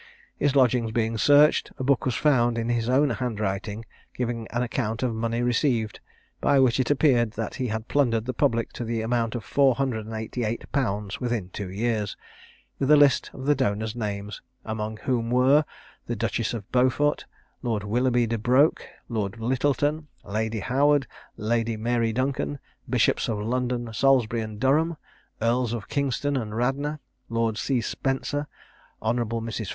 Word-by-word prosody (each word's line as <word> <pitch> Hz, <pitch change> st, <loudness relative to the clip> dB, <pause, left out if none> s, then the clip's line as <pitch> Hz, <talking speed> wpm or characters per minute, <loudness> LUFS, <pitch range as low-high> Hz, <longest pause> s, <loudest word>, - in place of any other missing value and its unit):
His 145 Hz, -1 st, +1 dB
lodgings 125 Hz, -4 st, +3 dB
being 115 Hz, 0 st, 0 dB
searched, 145 Hz, +4 st, +5 dB
a -, -, -4 dB
book 135 Hz, -1 st, +2 dB
was 125 Hz, -, 0 dB
found 120 Hz, -5 st, +3 dB
in 115 Hz, 0 st, -1 dB
his 120 Hz, 0 st, 0 dB
own 140 Hz, +2 st, +3 dB
handwriting, 105 Hz, -2 st, -3 dB, 0.3 s
giving 120 Hz, -2 st, -3 dB
an 120 Hz, +2 st, -1 dB
account 115 Hz, 0 st, -2 dB
of 125 Hz, -2 st, 0 dB
money 115 Hz, +1 st, -1 dB
received, 120 Hz, -3 st, 0 dB, 0.4 s
(by 140 Hz, -, +3 dB
which 130 Hz, -1 st, +3 dB
it 130 Hz, -, +1 dB
appeared 130 Hz, -6 st, +3 dB
that 110 Hz, -1 st, -4 dB
he 125 Hz, -, 0 dB
had 110 Hz, +1 st, -4 dB
plundered 115 Hz, -6 st, +1 dB
the 130 Hz, -, -2 dB
public 115 Hz, 0 st, 0 dB
to -, -, -5 dB
the 115 Hz, -1 st, -2 dB
amount 115 Hz, 0 st, 0 dB
of 120 Hz, -, -4 dB
four 135 Hz, 0 st, +3 dB
hundred 115 Hz, -5 st, -2 dB
and 110 Hz, -, -6 dB
eighty 110 Hz, +2 st, -4 dB
eight 110 Hz, +1 st, -2 dB
pounds 105 Hz, -7 st, -1 dB
within 120 Hz, -7 st, -2 dB
two 100 Hz, -3 st, -5 dB
years,) 105 Hz, +1 st, -2 dB, 0.6 s
with 135 Hz, -, 0 dB
a 150 Hz, -, +8 dB
list 145 Hz, -2 st, +4 dB
of 130 Hz, -, -8 dB
the 145 Hz, -, +4 dB
donors' 110 Hz, -4 st, -1 dB
names, 105 Hz, -2 st, -4 dB, 0.2 s
among 110 Hz, 0 st, -4 dB
whom 120 Hz, -3 st, 0 dB
were, 130 Hz, +5 st, +4 dB, 0.4 s
the 120 Hz, -, -2 dB
Duchess 115 Hz, +1 st, -1 dB
of 105 Hz, -4 st, -8 dB
Beaufort, 130 Hz, +4 st, +2 dB, 0.4 s
Lord 115 Hz, -5 st, -1 dB
Willoughby 120 Hz, +3 st, +2 dB
de 115 Hz, 0 st, -2 dB
Broke, 130 Hz, +7 st, +3 dB, 0.2 s
Lord 110 Hz, -2 st, -3 dB
Lyttleton, 145 Hz, +5 st, 0 dB, 0.2 s
Lady 110 Hz, +1 st, -2 dB
Howard, 140 Hz, +4 st, +3 dB, 0.3 s
Lady 115 Hz, +1 st, 0 dB
Mary 115 Hz, 0 st, 0 dB
Duncan, 135 Hz, +4 st, -1 dB, 0.3 s
Bishops -, -, +2 dB
of 110 Hz, -, -1 dB
London, 120 Hz, +1 st, -2 dB
Salisbury, 120 Hz, -1 st, +3 dB
and 110 Hz, -1 st, -6 dB
Durham, 155 Hz, +5 st, +2 dB, 0.5 s
Earls 120 Hz, 0 st, +1 dB
of 115 Hz, -4 st, -5 dB
Kingston 140 Hz, +1 st, 0 dB
and 110 Hz, -3 st, -4 dB
Radnor, 140 Hz, +5 st, -1 dB, 0.3 s
Lord 115 Hz, -1 st, 0 dB
C. 130 Hz, -3 st, 0 dB
Spencer, 135 Hz, +5 st, -2 dB, 0.5 s
Hon. 110 Hz, +2 st, 0 dB
Mrs. 115 Hz, -2 st, -3 dB
120 Hz, 165 wpm, -25 LUFS, 110-130 Hz, 0.6 s, a